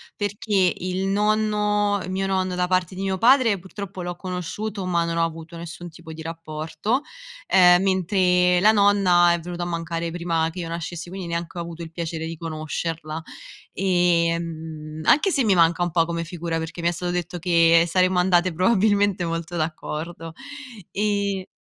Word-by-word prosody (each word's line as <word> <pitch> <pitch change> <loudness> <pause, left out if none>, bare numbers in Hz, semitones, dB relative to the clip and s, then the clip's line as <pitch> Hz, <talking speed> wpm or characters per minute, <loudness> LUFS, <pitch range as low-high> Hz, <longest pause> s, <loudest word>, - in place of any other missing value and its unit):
perché 205 -2 0
il 185 +1 -2
nonno 210 0 +1
mio 190 +1 -2
nonno 185 -1 0
da 180 0 +1
parte 185 0 0
di 190 - -5
mio 190 -1 -1
padre 235 -3 +4
purtroppo 190 0 -8
l'ho 175 0 -4
conosciuto, 185 +3 -5
ma 170 -2 +1
non 170 0 -2
ho 165 - +3
avuto 165 +1 -8
nessun 170 +1 -8
tipo 160 0 -11
di 160 - -9
rapporto, 165 - -3 0.5
ehm, 180 -1 +6
mentre 180 -1 +3
la 215 +2 +6
nonna 195 -4 +4
è 170 - -1
venuta 175 +1 -5
a - - -2
mancare 165 -1 -3
prima 165 -2 -1
che 170 +3 -8
io 165 - -4
nascessi, 170 +1 -5
quindi 185 -2 -6
neanche 170 +1 -4
ho - - -2
avuto 170 0 -7
il 160 - -9
piacere 165 -1 -4
di 165 0 -6
conoscerla. 160 0 -4 0.5
Ehm, 165 -4 0
anche 305 - +4
se 275 -8 +1
mi 200 -4 +3
manca 170 +1 +3
un 175 - -1
po' 165 -1 +3
come 170 0 -3
figura, 170 -1 -4
perché 165 +1 -5
mi 170 - +1
è - - +3
stato 175 +1 -3
detto 175 0 -3
che 170 -1 +4
saremmo 185 +2 +2
andate 180 -1 +3
probabilmente 200 0 +2
molto 165 +1 -4
d'accordo. 165 +1 -4 0.6
E 200 -2 -1
175 Hz, 170 wpm, -23 LUFS, 165-190 Hz, 0.6 s, ehm